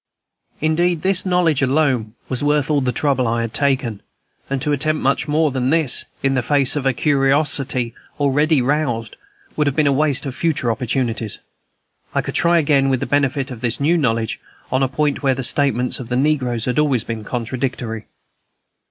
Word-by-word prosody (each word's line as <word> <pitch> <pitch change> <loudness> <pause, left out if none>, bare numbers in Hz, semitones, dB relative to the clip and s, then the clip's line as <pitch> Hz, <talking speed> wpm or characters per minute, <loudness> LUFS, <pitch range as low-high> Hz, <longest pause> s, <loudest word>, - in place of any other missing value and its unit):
Indeed, 160 +1 +1
this 190 0 +1
knowledge 175 -6 +2
alone 130 -5 +1
was 130 +1 -3
worth 145 0 +1
all 145 -2 +2
the 130 -1 0
trouble 135 -3 0
I 115 +1 0
had 115 -1 -4
taken, 130 -7 0 0.5
and 135 0 -1
to 150 - 0
attempt 155 +2 0
much 135 +3 +1
more 150 0 +2
than 130 -1 -1
this, 155 -4 +2 0.2
in 135 0 +2
the 130 - +1
face 140 +2 +2
of 140 -2 -1
a - - +4
curiosity 135 -3 +1 0.3
already 145 0 +2
roused, 125 -5 -1 0.4
would 150 -1 +1
have 140 - 0
been 155 - +2
a 140 - +4
waste 145 0 +2
of 135 - -4
future 150 -6 0
opportunities. 115 -2 -2 0.8
I - - +1
could - - -5
try 170 0 +3
again, 140 -3 +3
with 130 -2 +1
the - - -2
benefit 140 -1 0
of 120 -3 -8
this 120 -2 -1
new 155 +5 +2
knowledge, 115 -8 0 0.3
on 130 - +1
a 135 - +3
point 145 +2 -1
where 135 -2 +2
the 135 - -4
statements 125 -2 +1
of 125 -2 -8
the 125 - 0
negroes 130 -5 0
had 125 +2 0
always 140 -7 +2
been 115 -2 -5
contradictory. 120 -1 -4
135 Hz, 185 wpm, -20 LUFS, 125-150 Hz, 0.8 s, a